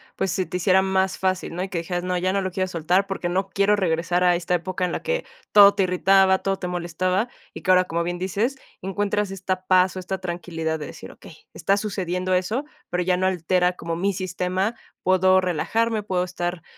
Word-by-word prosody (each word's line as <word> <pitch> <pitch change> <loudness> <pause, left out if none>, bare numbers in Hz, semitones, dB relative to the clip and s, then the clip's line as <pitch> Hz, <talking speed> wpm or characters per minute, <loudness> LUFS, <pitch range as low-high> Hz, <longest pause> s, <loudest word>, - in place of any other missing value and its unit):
pues, 190 - -1
se 185 -1 -1
te 180 - -3
hiciera 185 +1 +4
más 190 0 0
fácil, 185 -2 -1
¿no? 180 - -4
Y 190 - -3
que 185 - -4
dijeras, 175 +1 -3
no, 180 0 -1
ya 185 +1 0
no 200 - +1
lo 190 - -2
quiero 185 +1 -1
soltar 180 +3 +1
porque 190 -3 -3
no 190 +2 -1
quiero 200 +2 +3
regresar 175 -1 0
a 180 -1 +4
esta 180 +1 0
época 180 +1 -2
en 180 - -2
la - - -4
que - - -1 0.3
todo 200 -1 +8
te 200 - +2
irritaba, 190 +1 +4
todo 195 0 -1
te 180 - -4
molestaba, 180 +4 -1 0.3
y - - -8
que - - -5
ahora, 185 0 +6
como 170 -1 -2
bien 175 +1 -2
dices, 200 +8 -1 0.3
encuentras 205 +1 -1
esta 185 -1 -4
paz, 185 0 +4
o 185 - -4
esta 190 +1 -4
tranquilidad 170 -3 -4
de 150 - -6
decir: - - -10
"Okey, - - -14 0.2
está 195 +5 +1
sucediendo 185 -3 -2
eso, 210 +10 0 0.2
pero 180 0 0
ya 180 +1 +2
no 185 +1 +1
altera 180 0 +1
como 165 -1 -4
mi 195 +4 0
sistema". 185 +3 -2 0.3
Puedo 185 0 +4
relajarme, 215 +6 0
puedo 185 -3 -1
estar 175 -1 -4
185 Hz, 220 wpm, -23 LUFS, 180-195 Hz, 0.3 s, todo